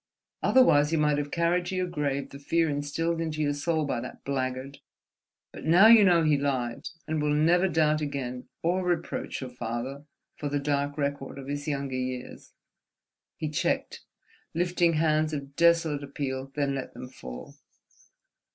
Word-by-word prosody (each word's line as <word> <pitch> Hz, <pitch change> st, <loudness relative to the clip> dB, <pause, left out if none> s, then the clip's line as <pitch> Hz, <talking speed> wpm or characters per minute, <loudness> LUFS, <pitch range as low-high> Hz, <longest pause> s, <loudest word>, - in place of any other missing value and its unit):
Otherwise 150 Hz, -, +5 dB
you 165 Hz, -, +2 dB
might 150 Hz, -1 st, +2 dB
have 145 Hz, 0 st, -3 dB
carried 170 Hz, +3 st, +1 dB
to 190 Hz, -, -3 dB
your 185 Hz, 0 st, 0 dB
grave 145 Hz, -5 st, -2 dB
the 140 Hz, -, -9 dB
fear 165 Hz, +3 st, +1 dB
instilled 155 Hz, +3 st, -1 dB
into 155 Hz, -2 st, -3 dB
your 145 Hz, -1 st, +1 dB
soul 155 Hz, +2 st, 0 dB
by 135 Hz, -, -1 dB
that 130 Hz, -, -9 dB
blackguard. 130 Hz, 0 st, -3 dB, 0.7 s
But -, -, -10 dB
now 170 Hz, +6 st, +6 dB
you 225 Hz, -1 st, +9 dB
know 175 Hz, -4 st, +5 dB
he 155 Hz, -2 st, +3 dB
lied, 130 Hz, -4 st, -2 dB, 0.2 s
and 155 Hz, -1 st, -1 dB
will 150 Hz, 0 st, +1 dB
never 175 Hz, +5 st, +4 dB
doubt 155 Hz, -3 st, +2 dB
again—or 140 Hz, +6 st, -3 dB
reproach 175 Hz, -4 st, -2 dB
your 130 Hz, -1 st, -6 dB
father 125 Hz, +4 st, -5 dB, 0.3 s
for 145 Hz, -, -3 dB
the 145 Hz, -, 0 dB
dark 145 Hz, 0 st, -1 dB
record 140 Hz, -2 st, -3 dB
of 135 Hz, -, -8 dB
his 145 Hz, +1 st, -4 dB
younger 140 Hz, -2 st, -2 dB
years." 130 Hz, -1 st, -5 dB, 0.9 s
He 155 Hz, -, -3 dB
checked, 150 Hz, -, -1 dB, 0.5 s
lifting 175 Hz, 0 st, +2 dB
hands 155 Hz, 0 st, +2 dB
of 140 Hz, -1 st, -6 dB
desolate 165 Hz, -3 st, +3 dB
appeal, 135 Hz, -1 st, -4 dB
then 140 Hz, -2 st, 0 dB
let 135 Hz, -1 st, -5 dB
them 125 Hz, -, -7 dB
fall. 65 Hz, -, -10 dB
145 Hz, 160 wpm, -27 LUFS, 140-165 Hz, 0.9 s, you